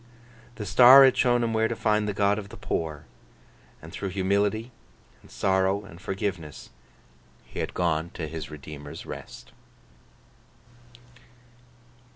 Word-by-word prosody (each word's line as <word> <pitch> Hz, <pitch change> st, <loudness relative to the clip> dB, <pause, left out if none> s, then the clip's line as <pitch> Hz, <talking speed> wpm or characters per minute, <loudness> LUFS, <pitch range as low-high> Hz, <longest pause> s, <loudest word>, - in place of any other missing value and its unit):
The 105 Hz, -, -6 dB
star 125 Hz, +5 st, +8 dB
had 130 Hz, -, +4 dB
shown 120 Hz, -1 st, +2 dB
him 115 Hz, -1 st, -1 dB
where 110 Hz, 0 st, +2 dB
to 115 Hz, -, -3 dB
find 105 Hz, -1 st, 0 dB
the 105 Hz, -, -2 dB
God 100 Hz, +1 st, +2 dB
of 100 Hz, -1 st, -9 dB
the -, -, -11 dB
poor; 75 Hz, -2 st, -4 dB, 0.8 s
and -, -, -10 dB
through 95 Hz, -, -4 dB
humility, 100 Hz, +5 st, 0 dB, 0.5 s
and -, -, -19 dB
sorrow, 95 Hz, +1 st, 0 dB
and 85 Hz, -2 st, -13 dB
forgiveness, 95 Hz, -, -5 dB, 0.7 s
he -, -, -9 dB
had -, -, -4 dB
gone 85 Hz, -2 st, 0 dB
to 80 Hz, -, -4 dB
his 80 Hz, -2 st, -7 dB
Redeemer's 75 Hz, -1 st, -9 dB
rest. -, -, -10 dB
100 Hz, 135 wpm, -26 LUFS, 80-110 Hz, 0.8 s, star